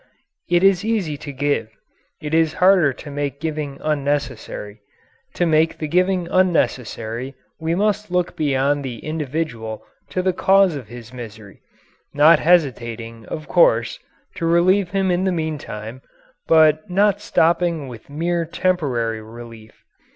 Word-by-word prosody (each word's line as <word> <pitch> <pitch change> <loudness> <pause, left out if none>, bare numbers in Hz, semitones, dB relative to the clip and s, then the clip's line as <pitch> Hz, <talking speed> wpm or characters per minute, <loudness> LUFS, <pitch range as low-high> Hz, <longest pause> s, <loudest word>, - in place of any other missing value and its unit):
It 175 +1 +3
is 195 -2 +4
easy 210 -9 -1
to 145 - -8
give; 140 -5 -1 0.5
it 150 0 -6
is 160 -1 +3
harder 180 -5 +4
to 145 +3 -10
make 140 -1 -3
giving 150 -3 -4
unnecessary. 140 -8 -3 0.5
To 175 - +1
make 160 0 +2
the 155 - -4
giving 180 +2 +1
unnecessary 130 -8 0 0.2
we 165 +1 -1
must 210 +1 0
look 180 0 -1
beyond 145 -1 +1
the 125 -3 -5
individual 150 -8 -4 0.2
to 185 - -2
the 185 0 +1
cause 195 -2 +3
of 130 -6 -7
his 120 +1 -11
misery 110 -5 -10 0.5
not 150 +2 +6
hesitating, 115 -9 0
of 155 - -6
course, - - +3 0.4
to 165 - -1
relieve 180 +3 +3
him 195 -1 0
in 180 +1 +1
the 190 - +1
meantime, 140 -8 -5 0.5
but 155 0 +4
not 200 +2 +2
stopping 165 -3 +1
with 120 -1 -11
mere 170 +4 -1
temporary 140 - -1
relief. 115 0 -13
155 Hz, 135 wpm, -21 LUFS, 125-175 Hz, 0.5 s, not